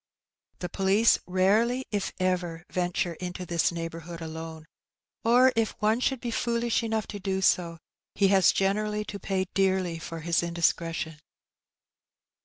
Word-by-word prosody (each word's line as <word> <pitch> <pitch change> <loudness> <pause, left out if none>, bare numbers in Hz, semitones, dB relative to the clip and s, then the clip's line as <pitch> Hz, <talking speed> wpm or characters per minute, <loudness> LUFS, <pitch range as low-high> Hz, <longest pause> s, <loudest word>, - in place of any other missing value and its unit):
The 180 - -2
poUce 195 +5 +3
rarely, 215 +8 +2
if 205 -2 -1
ever, 175 -2 -1
venture 175 -1 -1
into 180 +2 -6
this 170 -1 +1
neighbourhood 165 0 -6
alone, 160 -1 -7 0.6
or 250 +3 +5
if 225 -1 0
one 215 +2 +2
should 265 0 0
be 240 -1 -4
fooUsh 235 0 0
enough 220 -1 -1
to 205 - -7
do 190 0 -1
so, 170 -3 +2 0.4
he 195 -2 +3
has 190 -2 +5
generally 210 +2 0
to 205 -1 -6
pay 190 -1 -1
dearly 190 -3 +1
for 165 0 -7
his 170 +1 +1
indiscretion. 165 -2 -1
185 Hz, 140 wpm, -27 LUFS, 170-210 Hz, 0.6 s, or